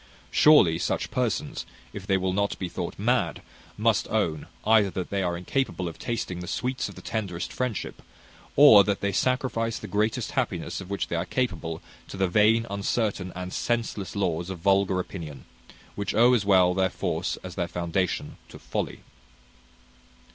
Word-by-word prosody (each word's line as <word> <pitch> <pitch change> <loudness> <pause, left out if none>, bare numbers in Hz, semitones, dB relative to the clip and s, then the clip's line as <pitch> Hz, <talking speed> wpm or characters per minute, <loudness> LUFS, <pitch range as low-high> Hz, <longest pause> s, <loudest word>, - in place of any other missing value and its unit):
Surely 100 - +6
such - - -1
persons, - - -1 0.3
if - - -8
they 95 - +3
will 95 0 -1
not 100 +1 0
be 90 - -3
thought - - -5
mad, - - 0 0.3
must - - +2
own, 80 -2 -1 0.2
either 110 -2 +5
that 95 -1 -5
they 100 -1 0
are 90 -2 -1
incapable 95 0 -2
of 85 - -8
tasting 105 -6 -3
the 90 - -7
sweets 125 +6 -2
of - - -11
the - - -12
tenderest 95 -6 -4
friendship, 125 -4 -3 0.5
or 120 -8 +9
that 100 0 -1
they 100 - 0
sacrifice 115 0 0
the 110 - -8
greatest 110 +5 0
happiness 100 - -2
of 95 - -10
which 100 -1 -2
they - - -2
are 85 +1 -1
capable 85 -9 -2 0.2
to - - -8
the 95 0 +2
vain, 110 +5 +4
uncertain, 100 -2 -1
and 90 0 -5
senseless 115 -5 -2
laws 90 -3 -1
of 95 - -4
vulgar 95 +1 +2
opinion, 80 -8 -7 0.5
which 100 -1 -3
owe 120 +2 +6
as 110 -5 +2
well 95 -3 +5
their 95 0 +2
force - - -2
as 90 -1 -7
their 90 -1 -2
foundation 85 +1 -2
to - - -11
folly." - - -4
95 Hz, 170 wpm, -26 LUFS, 90-110 Hz, 0.5 s, or